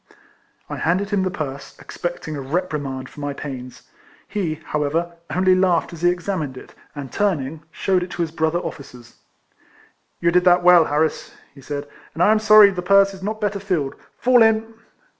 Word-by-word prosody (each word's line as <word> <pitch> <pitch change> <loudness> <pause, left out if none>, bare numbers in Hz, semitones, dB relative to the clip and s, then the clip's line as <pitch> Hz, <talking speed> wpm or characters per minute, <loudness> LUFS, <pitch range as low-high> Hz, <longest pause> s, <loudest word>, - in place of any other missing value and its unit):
I - - -6
handed 190 +5 0
him 200 -2 +1
the 185 - 0
purse, 140 -5 -6
expecting 175 -3 -6
a 140 - -5
rep 175 +8 -2
rimand 135 -3 -4
for - - -14
my 145 -1 -3
pains. 130 -3 -8 0.4
He, 185 -7 -2
however, 160 +2 -2
only 185 +1 +3
laughed 185 -2 +1
as 165 - -10
he 175 - +4
examined 175 -6 -3
it, - - -12 0.2
and, 140 -3 -7
turning, 160 -7 -1
shewed 185 +2 0
it 180 - -5
to 175 - -1
his 160 - -4
brother 160 +1 0
officers. 125 -8 -9 1.0
"You 170 0 +2
did 180 +1 +3
that 180 -1 +4
well, 175 -2 +7
Harris," 155 +2 -1 0.2
he 140 - -15
said, 145 +1 -5 0.3
"and 165 - +1
I 210 - +5
am 220 - +3
sorry 215 -1 +7
the 180 -2 -4
purse 195 +2 +4
is 190 - -12
not 215 +3 -4
better 205 -1 -1
filled. 175 -9 -2 0.2
Fall 250 -1 +4
in." 225 0 +3
175 Hz, 185 wpm, -21 LUFS, 150-190 Hz, 1.0 s, well